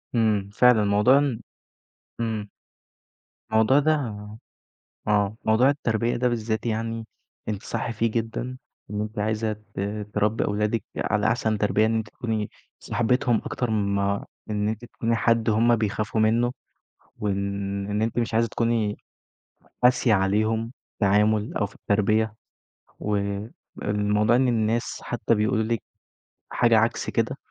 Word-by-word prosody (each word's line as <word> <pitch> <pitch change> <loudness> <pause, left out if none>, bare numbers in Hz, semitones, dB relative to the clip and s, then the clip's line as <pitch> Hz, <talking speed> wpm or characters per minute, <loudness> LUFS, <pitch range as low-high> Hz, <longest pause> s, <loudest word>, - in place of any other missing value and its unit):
إمم، 105 -4 +2
فعلًا 125 -1 +5
الموضوع 105 +6 +4
إن 140 -5 0 0.8
إمم. 110 -3 -2 1.0
الموضوع 110 +5 +4
ده 155 +2 +3 1.1
آه، 105 0 +2
موضوع 110 +5 +4
التربية 115 -4 0
ده 125 +1 +1
بالذات 110 -2 -2
يعني 115 0 -2 0.4
أنتِ 105 0 -3
صح 120 - -3
فيه 115 0 0
جدًا، 115 +3 -3 0.3
إن 105 0 -2
أنتِ 105 +1 -5
عايزة 110 +1 0
ت 105 -1 -12 0.3
تربي 105 +2 +1
أولادِك 105 +1 0
على 105 0 +1
أحسن 110 -1 +1
تربية 105 +1 +2
إن 110 +1 +1
أنتِ 110 -1 -3
تكوني 110 -3 -3 0.3
صاحبتهم 120 0 +1
أكتر 125 - -2
من 100 -2 +1
ما 100 0 0 0.2
إن 105 -1 0
أنتِ 110 +2 -5
تكوني 115 0 -1
حد 115 0 +2
هم 115 +2 +4
بيخافوا 110 0 -1
منه، 115 +3 +3 0.7
وإن 100 0 -2
أنتِ 115 +2 0
مش 115 -1 -2
عايزة 115 +1 +3
تكوني 115 -2 0 0.9
قاسية 125 -2 +4
عليهم 110 +4 +1 0.2
التعامل 105 +1 +2
أو 105 - 0
في 100 - -16
التربية، 105 +1 +1 0.7
والموضوع 105 +1 -1
إن 130 +1 +3
الناس 115 -1 0
حتى 115 - 0
بيقولوا 110 +1 +1
لِك 115 -1 -1 0.7
حاجة 115 -2 +4
عكس 110 +2 0
كده - - 0
110 Hz, 130 wpm, -25 LUFS, 105-115 Hz, 1.1 s, فعلًا